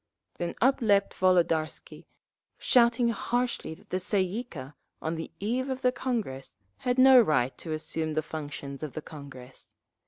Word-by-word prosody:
Then 175 - -3
up 265 +2 +3
leaped 200 -3 +3
Volodarsky, 170 -4 0 0.5
shouting 235 -1 +4
harshly 240 -4 -2
that - - -23
the 185 - 0
Tsay 190 +1 +1
ee 200 +7 -3
kah, 140 - -9 0.3
on 160 - -3
the 165 0 -5
eve 245 +6 -1
of 260 0 -3
the 250 - +4
Congress, 220 - -4 0.2
had 250 0 -1
no 260 -1 +8
right 135 - +1
to 165 - -5
assume 155 0 -3
the 155 - 0
functions 145 -3 -7
of 155 -3 -5
the 155 - -6
Congress. 135 -4 -11
180 Hz, 160 wpm, -28 LUFS, 155-240 Hz, 0.5 s, no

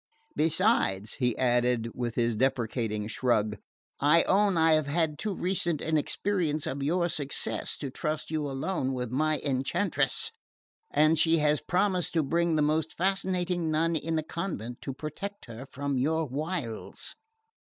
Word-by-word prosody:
Besides," 155 - +2
he 125 -3 +1
added 120 -2 +2
with 120 -2 -3
his 115 -1 +1
deprecating 115 -3 0
shrug, 110 -2 +1 0.4
"I 150 +4 +5
own 200 -1 +3
I 160 0 +5
have 155 -2 +2
had 155 0 0
too 210 -3 -2
recent 175 -4 0
an 160 +1 -1
experience 155 -1 0
of 140 - -3
your 170 +5 +1
success 145 -4 -3
to 140 -3 -5
trust 155 +2 -3
you 150 -2 -1
alone 135 0 -2
with 125 -2 -3
my 155 +3 +1
enchantress; 135 - 0 0.6
and 155 +1 +3
she 165 +1 +4
has 150 -1 +2
promised 185 -2 0
to 160 - +3
bring 170 +3 +1
the 150 - +3
most 155 +1 +1
fascinating 180 -2 0
nun 165 +2 +1
in 160 +1 -1
the 155 - 0
convent 150 - -5
to 135 - -4
protect 160 +8 -6
her 120 +3 -9
from 140 0 -2
your 160 +4 +1
wiles." 145 -4 -4
155 Hz, 155 wpm, -28 LUFS, 130-170 Hz, 0.6 s, I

